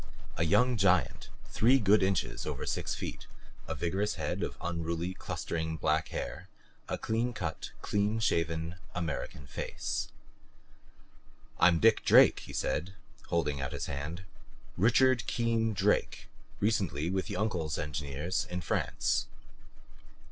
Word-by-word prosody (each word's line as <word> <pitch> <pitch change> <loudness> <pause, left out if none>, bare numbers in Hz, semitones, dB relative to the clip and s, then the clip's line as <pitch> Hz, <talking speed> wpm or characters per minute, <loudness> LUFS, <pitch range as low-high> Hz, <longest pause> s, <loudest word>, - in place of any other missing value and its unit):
A 85 - +1
young 125 +9 +3
giant, 95 -2 +2 0.2
three 125 +5 +4
good 105 -3 +4
inches 95 -1 0
over - - -3
six - - -2
feet, - - -6 0.4
a - - -3
vigorous 100 +5 -1
head 75 -3 -2
with - - -3
unruly 85 +1 -2
clustering 80 -3 -3
black 80 +1 +1
hair; - - -5 0.4
a - - -1
clean 115 +2 -1
cut, 85 -7 -4
clean 105 +2 +1
shaven 85 -3 0 0.2
American 80 -5 -4
face. - - -3 1.5
"I'm 90 -2 +6
Dick 115 0 +5
Drake," - - +7
he - - -10
said, 95 +2 -2 0.3
holding 75 -5 0
out 65 +3 -3
his 70 - -3
hand. 75 +6 -5 0.5
"Richard 120 +3 +4
Keen 115 -1 +1
Drake, 100 - 0 0.3
recently 95 - 0
with 95 0 -1
Uncle's 90 -7 -1
engineers 75 +4 -2
in 90 0 -3
France." 80 - 0
90 Hz, 125 wpm, -31 LUFS, 80-105 Hz, 1.5 s, Drake